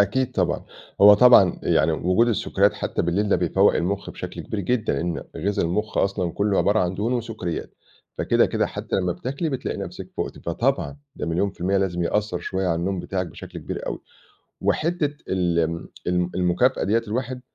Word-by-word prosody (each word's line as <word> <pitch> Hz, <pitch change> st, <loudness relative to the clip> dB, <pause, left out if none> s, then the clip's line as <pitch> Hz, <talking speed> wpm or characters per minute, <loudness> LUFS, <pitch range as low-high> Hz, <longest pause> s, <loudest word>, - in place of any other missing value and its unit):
أكيد 110 Hz, +6 st, +1 dB
طبعًا، -, -, 0 dB, 0.4 s
هو 105 Hz, +1 st, +10 dB
طبعًا، 115 Hz, -6 st, +6 dB
يعني 80 Hz, +1 st, +3 dB
وجود 90 Hz, +9 st, +2 dB
السكريات 100 Hz, -2 st, +2 dB
حتّى -, -, -2 dB
بالليل 95 Hz, +5 st, 0 dB
ده -, -, +4 dB
بيفوّق -, -, +3 dB
المخ 100 Hz, +3 st, -1 dB
بشكل -, -, -7 dB
كبير 105 Hz, -, -4 dB
جدًا، 115 Hz, +3 st, 0 dB
لأن 80 Hz, +3 st, -2 dB
غذا 100 Hz, +1 st, 0 dB
المخ 105 Hz, +6 st, -1 dB
أصلًا 95 Hz, -3 st, 0 dB
كُلّه 100 Hz, -1 st, +1 dB
عبارة 105 Hz, +2 st, +3 dB
عن 90 Hz, +1 st, 0 dB
دهون 110 Hz, +6 st, -1 dB
وسكريات، 110 Hz, -8 st, -4 dB, 0.4 s
فكده -, -, +3 dB
كده -, -, 0 dB
حتّى -, -, -4 dB
لمّا 90 Hz, -2 st, 0 dB
بتاكلي 135 Hz, -, -3 dB
بتلاقي 135 Hz, -3 st, -3 dB
نفسِك 95 Hz, -1 st, -7 dB
فُقتِ، -, -, -4 dB
فطبعًا، 135 Hz, -, -1 dB, 0.2 s
ده -, -, -4 dB
مليون 85 Hz, +5 st, 0 dB
في 95 Hz, -, -23 dB
الميّة 95 Hz, +2 st, +1 dB
لازم 90 Hz, -3 st, 0 dB
يأثّر 105 Hz, +1 st, 0 dB
شوية 95 Hz, +1 st, -2 dB
على 85 Hz, -, +2 dB
النوم 90 Hz, +2 st, -2 dB
بتاعِك 90 Hz, +1 st, -3 dB
بشكل 80 Hz, -, -9 dB
كبير -, -, -6 dB
أوي. -, -, -4 dB, 0.6 s
وحتّة 155 Hz, -3 st, 0 dB
ال 90 Hz, -2 st, +1 dB, 0.5 s
ال 90 Hz, 0 st, +1 dB
المكافأة 90 Hz, +9 st, +2 dB
ديَّة 115 Hz, +4 st, +2 dB
الواحد، 125 Hz, +2 st, -3 dB
100 Hz, 180 wpm, -23 LUFS, 90-110 Hz, 0.6 s, هو